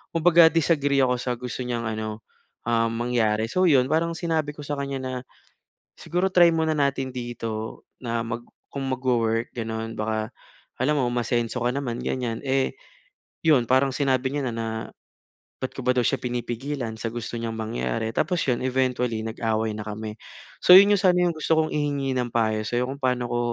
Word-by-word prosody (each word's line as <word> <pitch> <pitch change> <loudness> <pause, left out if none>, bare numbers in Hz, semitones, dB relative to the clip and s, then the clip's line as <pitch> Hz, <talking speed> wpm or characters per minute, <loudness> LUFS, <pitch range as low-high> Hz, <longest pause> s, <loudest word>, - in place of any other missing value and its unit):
kumbaga 165 0 +7
disagree 145 -4 +2
ako 125 -1 +2
sa 125 0 -2
gusto 125 0 -4
niyang 120 -2 -2
ano, 110 0 -4 0.4
um, 115 -1 +2
mangyari. 115 -2 +1
So, 185 +10 +1
iyon 130 -4 +4
parang 165 +2 +2
sinabi 160 -3 -1
ko 150 - -18
sa 145 - -2
kanya 140 -1 -3
na 130 0 -4 0.8
siguro 180 +2 -1
try 175 -2 +6
muna 160 -1 +1
natin 140 -2 0
dito 115 -2 -5 0.2
na 115 -1 -1
mag 115 +1 -5 0.3
kung 140 -1 -4
mag-wo-work 120 -3 0
ganoon 115 0 -4
baka 110 0 -1 0.5
alam 150 +4 +2
mo 125 - +1
umasenso 120 0 -1
ka 120 - +2
naman 125 -3 -3
ganyan, 120 -3 -2
eh 135 0 +1 0.7
iyon 145 -7 +5
parang 130 +1 +4
sinabi 130 -2 +1
niya 140 -4 -1
na - - -5
na 115 0 -3 0.9
bakit 130 - -4
ko - - -6
ba - - +6
daw 125 - +3
siya - - +1
pinipigilan 120 +1 -3
sa 115 - -2
gusto 120 0 -5
niyang 115 -1 -3
mangyari? 110 0 -2
Tapos 180 - 0
iyon 125 -2 +1
eventually 125 -3 0
nag-away 110 -1 -1
na 105 -1 -5
kami. 105 0 -5 0.4
So, 180 - +9
iyon 200 +1 +6
sana 185 -3 +4
yung 175 -1 +2
gusto 160 +1 +1
kong 155 0 +1
ihingi 145 -2 -1
ng 125 -1 0
payo 110 -2 +1
sayo. 120 +3 0
Kung 140 - -7
paano 125 -1 +1
ko 120 - 0
125 Hz, 180 wpm, -25 LUFS, 115-140 Hz, 0.9 s, So